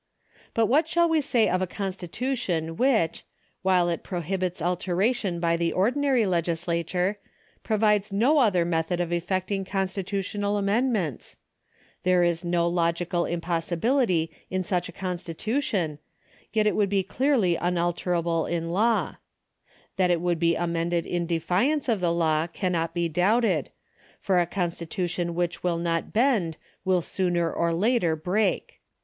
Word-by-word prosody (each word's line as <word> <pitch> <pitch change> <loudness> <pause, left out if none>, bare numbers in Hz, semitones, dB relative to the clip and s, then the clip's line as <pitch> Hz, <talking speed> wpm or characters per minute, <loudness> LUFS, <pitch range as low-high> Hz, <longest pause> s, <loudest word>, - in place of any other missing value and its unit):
But 230 - +4
what 295 +8 +3
shall 340 +1 +3
we 325 -2 +2
say 245 -5 +2
of 185 +1 +1
a 185 - 0
constitution 185 -2 -3
which, 225 -8 +1 0.4
while 185 -2 +3
it 170 -1 -1
prohibits 180 0 -3
alteration 180 +3 0
by 170 0 +2
the 170 0 0
ordinary 255 +4 +2
legislature, 175 +2 -1 0.4
provides 210 -2 +1
no 250 +10 +3
other 190 -9 +3
method 165 +1 -1
of 175 -1 -1
effecting 185 +3 -1
constitutional 195 +1 -2
amendments? 200 - -1 0.6
There 180 -1 +3
is 170 0 0
no 170 -1 +1
logical 170 0 0
impossibility 175 - 0 0.2
in 185 0 -1
such 180 0 -1
a - - -7
constitution, 180 - -2 0.5
yet 215 -1 +2
it 210 - +2
would 205 -2 +2
be 195 -1 +1
clearly 250 -8 +1
un 175 +1 0
alterable 170 -1 0
in 165 -1 -2
law. 225 +5 +1 0.8
That 185 -1 +3
it 175 -1 +2
would 175 -1 0
be 170 0 +3
amended 170 0 -1
in 175 -1 -2
defiance 180 - +1
of 225 -5 +1
the 175 -2 +1
law 160 -1 +1
cannot 170 -2 -2
be 170 -1 +1
doubted, 185 - +2 0.5
for 185 -2 +2
a 175 - +1
constitution 175 -1 -2
which 175 0 -1
will 175 -2 0
not 165 -1 -1
bend 215 - +2 0.3
will 185 -2 +2
sooner 175 -2 0
or 170 0 0
later 180 -1 +2
break. 185 +6 -1
180 Hz, 140 wpm, -26 LUFS, 170-205 Hz, 0.8 s, But